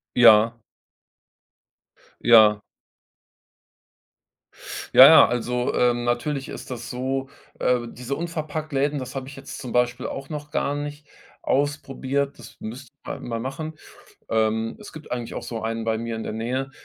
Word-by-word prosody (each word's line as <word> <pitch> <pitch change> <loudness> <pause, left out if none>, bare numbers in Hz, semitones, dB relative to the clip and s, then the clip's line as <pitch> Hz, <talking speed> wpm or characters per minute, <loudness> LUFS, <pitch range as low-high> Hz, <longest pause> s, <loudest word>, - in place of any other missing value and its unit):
Ja. 115 -2 +7 1.7
Ja. 110 -3 +7 2.3
Ja, - - +11
ja, - - +9
also, 125 +1 -1
äh, 125 -1 +3
natürlich 120 +4 -2
ist - - -8
das 120 -1 -6
so, 135 +2 -2 0.3
äh, 125 -1 +1
diese 125 +3 -5
Unverpackt-Läden, 155 -3 -2
das 130 -1 -7
habe 135 -1 -5
ich 140 - -10
jetzt - - -9
zum 125 -3 -6
Beispiel 125 0 +1
auch 135 0 -6
noch 150 -1 -6
gar 140 - -1
nicht 145 0 -6 0.4
ausprobiert, 140 0 -1
das - - -13
müsste 120 +4 -8
man - - -4
halt - - -13
mal 115 -2 -3
machen. 155 +6 -5 0.5
Ähm, 110 0 0
es - - -11
gibt 155 - -11
eigentlich 120 -2 -4
auch - - -5
so 115 -2 -5
einen 115 +1 -3
bei 110 -1 0
mir 115 0 -4
in 110 - -4
der - - -4
Nähe, 125 +5 -3
125 Hz, 150 wpm, -24 LUFS, 115-140 Hz, 2.3 s, Ja